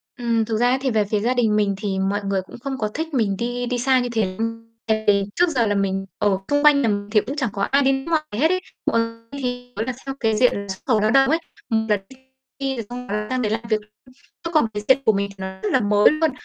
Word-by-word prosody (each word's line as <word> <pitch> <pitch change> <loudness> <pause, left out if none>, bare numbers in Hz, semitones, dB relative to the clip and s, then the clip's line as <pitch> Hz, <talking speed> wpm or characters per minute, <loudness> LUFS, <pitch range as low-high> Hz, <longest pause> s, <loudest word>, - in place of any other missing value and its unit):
Ừm, 230 -2 0
thực 220 -1 -1
ra 245 +2 +3
ấy, 255 - +3
thì 265 - 0
về 215 -2 +2
phía 210 +1 0
gia 235 +5 +1
đình 230 -4 +2
mình 205 -2 +2
thì 195 -2 -2
mọi 195 +2 0
người 195 -1 0
cũng 185 - -12
không 270 +1 -4
có 215 -4 -1
thích 320 +1 -4
mình 215 -7 +1
đi 245 +1 -2
đi 245 0 -1
xa 260 +1 +3
như 245 -1 -2
thế 220 -3 +1
lắm. 230 0 -3 0.2
Tại 220 0 +1
vì 200 -1 +4
trước 355 0 +3
giờ 245 -7 +1
là 205 - +1
mình 195 -1 0
ở 200 -2 +2
xung 290 0 +2
quanh 295 -2 +6
nhà 235 - +2
mình 205 0 -2
thì 210 -1 +4
cũng 270 +7 -5
chẳng 265 -6 -1
có 200 - -4
ai 275 +7 +3
đi 270 - +4
nước 270 0 -2
ngoài 315 -2 +2 0.2
hết 320 +3 +4
ấy, 370 - 0 0.3
hoặc 230 - +2 0.3
thì, 245 -2 -5
gọi 220 - -2
là, 255 - -2
theo 270 0 -4
cái 220 -2 +1
diện 250 +3 +4
là 200 - -9
xuất 190 0 -5
khẩu 225 -5 +3
lao 215 - +2
động 270 +1 +5
ấy, 320 - +3 0.3
một 220 -1 +1
là 210 - +4 0.6
đi 270 -1 -1
rồi 230 -3 -5
xong 250 +1 -7 0.2
sang 255 0 0
đấy 215 -3 0
làm 225 - -1
việc, 215 -1 +1 0.6
chứ 335 - -3
còn 305 - +4
cái 210 - -3
diện 265 +1 +6
của 220 - +5
mình 200 0 -1
thì 200 - -13
nó 190 0 -6
rất 215 - -1
là - - +4
mới 205 0 +5
luôn, 310 +1 +1
230 Hz, 290 wpm, -22 LUFS, 210-265 Hz, 0.6 s, quanh